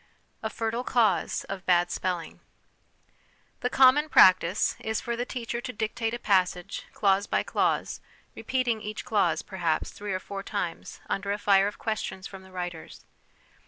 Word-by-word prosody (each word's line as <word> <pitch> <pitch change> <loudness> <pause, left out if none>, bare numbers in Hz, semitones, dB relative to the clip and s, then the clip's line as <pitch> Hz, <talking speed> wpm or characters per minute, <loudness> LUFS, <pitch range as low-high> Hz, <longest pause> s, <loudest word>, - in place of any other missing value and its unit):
A 220 - -2
Fertile 230 +2 -2
Cause 220 -8 +1
of 195 -1 -6
Bad 175 -1 +3
Spelling. 175 -3 -3 1.2
The 250 - -1
common 270 +4 +5
practice 185 - +5
is 220 0 -2
for 235 - -3
the 240 +1 -2
teacher 235 -1 -4
to 250 - -5
dictate 225 +1 -2
a - - -4
passage, 185 -3 0
clause 200 0 +2
by - - +1
clause, - - 0 0.3
repeating 245 -4 -1
each 215 0 -6
clause, 210 -2 +1
perhaps, 175 -5 -1
three 205 0 -6
or 185 - -1
four 195 +1 -6
times 195 -4 -5
under 200 +1 -2
a 205 - 0
fire 200 -1 +4
of 205 - -5
questions 215 -4 -4
from 190 -1 -9
the 190 0 -16
writers. 175 -3 -7
205 Hz, 160 wpm, -27 LUFS, 185-230 Hz, 1.2 s, common